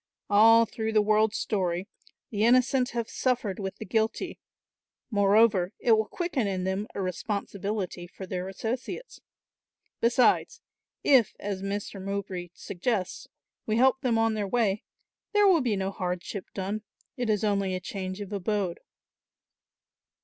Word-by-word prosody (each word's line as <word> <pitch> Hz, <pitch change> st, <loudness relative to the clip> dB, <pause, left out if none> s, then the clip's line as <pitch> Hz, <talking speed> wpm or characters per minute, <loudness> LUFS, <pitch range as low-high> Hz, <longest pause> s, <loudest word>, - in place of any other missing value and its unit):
All 225 Hz, +3 st, +7 dB
through 220 Hz, 0 st, -3 dB
the 215 Hz, -, +5 dB
world's 215 Hz, +1 st, +3 dB
story 185 Hz, -2 st, -1 dB, 0.4 s
the 210 Hz, -1 st, 0 dB
innocent 250 Hz, +2 st, +4 dB
have 235 Hz, -1 st, -3 dB
suffered 235 Hz, -8 st, -1 dB
with 195 Hz, -1 st, -4 dB
the -, -, -8 dB
guilty; 220 Hz, -, -1 dB, 0.7 s
moreover, 205 Hz, -2 st, +4 dB
it 235 Hz, -, +1 dB
will 220 Hz, -1 st, +4 dB
quicken 340 Hz, -, -1 dB
in 190 Hz, -2 st, -2 dB
them 190 Hz, +3 st, -1 dB
a 200 Hz, -, -2 dB
responsibility 200 Hz, -1 st, -3 dB
for 190 Hz, +2 st, -9 dB
their 185 Hz, 0 st, -4 dB
associates. 240 Hz, -, -5 dB, 0.8 s
Besides, 240 Hz, +2 st, +3 dB, 0.4 s
if, 255 Hz, -7 st, +4 dB
as 200 Hz, -2 st, -4 dB
Master 200 Hz, 0 st, -4 dB
Mowbray 190 Hz, -2 st, -4 dB
suggests, 190 Hz, 0 st, -3 dB, 0.4 s
we 215 Hz, 0 st, +1 dB
help 265 Hz, +2 st, +4 dB
them 245 Hz, -4 st, +1 dB
on 225 Hz, 0 st, +2 dB
their 210 Hz, -2 st, -2 dB
way 210 Hz, -2 st, +1 dB, 0.5 s
there 415 Hz, -1 st, +5 dB
will 350 Hz, -5 st, +5 dB
be 235 Hz, -5 st, +1 dB
no 190 Hz, 0 st, -2 dB
hardship 180 Hz, +1 st, -4 dB
done, 200 Hz, +3 st, -3 dB, 0.3 s
it 245 Hz, -4 st, -2 dB
is 210 Hz, 0 st, +1 dB
only 200 Hz, -3 st, +1 dB
a -, -, -2 dB
change 185 Hz, +1 st, -5 dB
of 205 Hz, 0 st, -6 dB
abode. 195 Hz, -2 st, -1 dB
205 Hz, 140 wpm, -28 LUFS, 190-230 Hz, 0.8 s, All